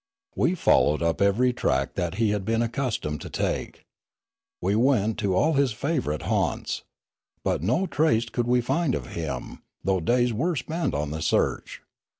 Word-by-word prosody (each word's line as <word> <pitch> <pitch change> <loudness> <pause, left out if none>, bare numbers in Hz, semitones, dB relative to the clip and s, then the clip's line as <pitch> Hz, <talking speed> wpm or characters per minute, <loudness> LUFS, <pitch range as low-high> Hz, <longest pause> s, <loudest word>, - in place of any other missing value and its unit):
We 175 - +2
followed 75 - +3
up 85 +2 0
every 115 +6 +3
track 65 - 0
that 90 -1 -2
he 110 0 +2
had 105 -2 -1
been 115 +3 +1
accustomed 115 - -2
to - - -7
take. - - -3 0.8
We 95 +3 0
went 110 -3 +2
to 100 -3 0
all 155 - +3
his 140 -4 +2
favourite 125 - -2
haunts. - - -1 0.6
But - - 0
no 125 - +1
trace 135 -9 +2
could 120 0 -2
we 125 0 +3
find 155 +3 0
of - - -6
him, 80 -4 -5 0.2
though 95 0 +1
days 120 +7 +2
were 160 +10 0
spent 160 +5 -2
on 75 0 -2
the 80 +1 -4
search. 85 - 0
115 Hz, 165 wpm, -25 LUFS, 90-130 Hz, 0.8 s, followed